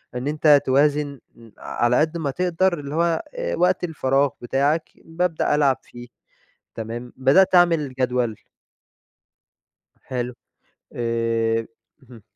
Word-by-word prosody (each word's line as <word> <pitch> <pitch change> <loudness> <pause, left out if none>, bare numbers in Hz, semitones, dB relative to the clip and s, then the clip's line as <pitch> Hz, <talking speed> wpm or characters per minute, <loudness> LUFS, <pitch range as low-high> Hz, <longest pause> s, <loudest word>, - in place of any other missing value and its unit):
إن 125 +3 -3
أنت 150 -1 +4
توازن 145 +1 +1 0.2
ن 115 -1 -17
على 120 +1 0
قد 160 +2 0
ما 145 -4 -2
تقدر 180 +1 0
اللي 145 +1 -6
هو 170 0 +1
آآ، - - -3
وقت 180 0 +1
الفراغ 140 -4 +1
بتاعك 140 +6 0 0.2
بابدأ 165 -2 0
ألعب 140 -3 +3
فيه. 120 0 -12 0.7
تمام؟ 115 +2 -6
بدأت 185 +9 +4
اعمل 165 -6 +3
جدول 125 -4 -1 1.7
حلو. 125 -1 -3 0.6
آآ، 120 - -3 1.0
اهم. 120 -3 -15
145 Hz, 115 wpm, -22 LUFS, 125-165 Hz, 1.7 s, أنت